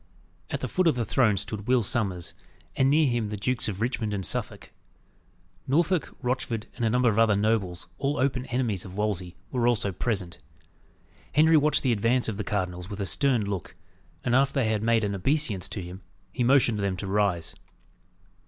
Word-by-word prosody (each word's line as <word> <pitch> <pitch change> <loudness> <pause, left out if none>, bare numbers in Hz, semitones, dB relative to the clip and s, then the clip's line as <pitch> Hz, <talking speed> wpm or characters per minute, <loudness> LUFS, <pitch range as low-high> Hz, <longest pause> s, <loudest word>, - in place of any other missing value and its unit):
At - - -3
the - - -2
foot 185 -1 +1
of 160 - +3
the 120 -2 -1
throne 110 -3 +2
stood 105 +3 -5
Will 125 -2 +3
Sommers, 100 -7 -2 0.4
and 130 0 +3
near 155 +2 +4
him 120 -4 -1
the 105 - -4
Dukes 125 +5 -1
of 100 -1 -4
Richmond 115 -3 -1
and 95 -2 -4
Suffolk. - - -4 1.0
Norfolk, 165 +3 +1
Rochford, 125 -3 -1
and - - -4
a 115 - +3
number 125 +2 +2
of 110 -1 +2
other 110 -2 +4
nobles, 100 -4 0
all 145 +2 0
open 130 -1 0
enemies 120 -7 -1
of 95 0 -10
Wolsey, 95 -5 -2 0.2
were 120 -2 +1
also 110 -4 +1
present. 95 -3 -3 1.0
Henry 160 +2 +6
watched 150 0 +3
the 130 - +2
advance 115 +4 +1
of 110 -3 -3
the 105 - -2
cardinals 90 -4 -3
with 105 -1 -6
a 100 - -1
stern 125 0 +1
look, 100 -4 -5 0.5
and 120 - 0
after 135 +2 +3
they 125 -5 +1
had 105 -2 0
made 115 0 +2
an 100 -1 -1
obeisance 105 - 0
to 100 - -5
him, 90 +2 -9 0.3
he 125 - -1
motioned 120 -4 +4
them 100 -2 -1
to 100 - -5
rise. 95 -4 0
110 Hz, 190 wpm, -27 LUFS, 100-130 Hz, 1.0 s, Henry